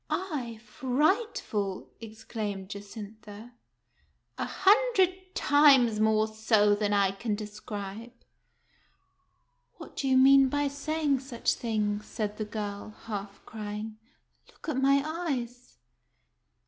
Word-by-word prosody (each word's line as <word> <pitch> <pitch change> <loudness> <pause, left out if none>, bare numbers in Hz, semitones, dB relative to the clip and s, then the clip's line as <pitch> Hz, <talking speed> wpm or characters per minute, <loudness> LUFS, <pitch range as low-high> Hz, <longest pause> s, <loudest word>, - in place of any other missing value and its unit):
" - - -44
I 285 - -3
frightful! 260 - -1
" - - -39
exclaimed 215 -3 -6
Jacintha. 210 +2 -9 0.9
"A - - 0
hundred 405 -3 +3 0.2
times 275 -7 +5
more 215 0 +3
so 215 -1 +3
than 205 0 0
I 200 -2 +3
can 205 +2 -3
describe." 210 +1 -7 1.6
"What - - -12
do 275 - -1
you 260 -1 +4
mean 270 0 +7
by 290 +1 0
saying 285 0 0
such 255 -3 -1
things?" 210 -2 -2
said 210 -1 -4
the 215 - -3
girl, 210 0 -6
half 200 -2 -6
crying. 215 0 -6 0.2
" - - -43
Look - - -16
at 265 -3 -1
my 275 +1 +4
eyes." 255 -7 -4
225 Hz, 120 wpm, -29 LUFS, 210-275 Hz, 1.6 s, mean